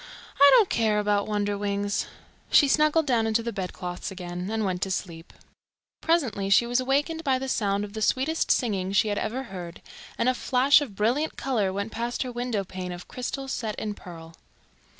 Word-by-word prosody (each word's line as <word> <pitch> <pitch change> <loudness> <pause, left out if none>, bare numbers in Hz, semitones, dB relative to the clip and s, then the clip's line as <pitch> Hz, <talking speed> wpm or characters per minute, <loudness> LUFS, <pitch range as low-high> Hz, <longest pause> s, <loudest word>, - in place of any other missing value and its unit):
"I 280 0 +9
don't 450 -5 +6
care 220 -7 +1
about 205 -1 +1
Wonderwings." 205 -1 -1 0.4
She 290 - +6
snuggled 305 +2 +3
down 235 -5 +2
into 225 +1 +1
the 235 - -4
bedclothes 180 -2 -5
again, 180 0 -6
and 220 -1 -1
went 180 -2 -2
to 195 - -1
sleep. 170 -3 -5 0.7
Presently 250 -13 0
she 200 +4 +5
was 245 +1 +1
awakened 290 +5 0
by 270 -4 +2
the 265 +1 -4
sound 200 -5 0
of 205 -1 -7
the 220 - -5
sweetest 275 +8 +1
singing 195 -5 +1
she 210 +2 +3
had 205 - -1
ever 255 +5 -3
heard, 180 -7 -8 0.4
and 235 - +1
a 255 - +4
flash 260 +3 +4
of 245 -9 -6
brilliant 245 +10 0
colour 225 -8 0
went 200 +3 -4
past 235 +3 -2
her 255 - -5
window 240 -4 -2
pane 185 -1 -6
of 175 0 -8
crystal 270 +2 -5
set 225 -5 -3
in 210 -1 -4
pearl. 165 -4 -11
215 Hz, 190 wpm, -26 LUFS, 195-255 Hz, 0.7 s, I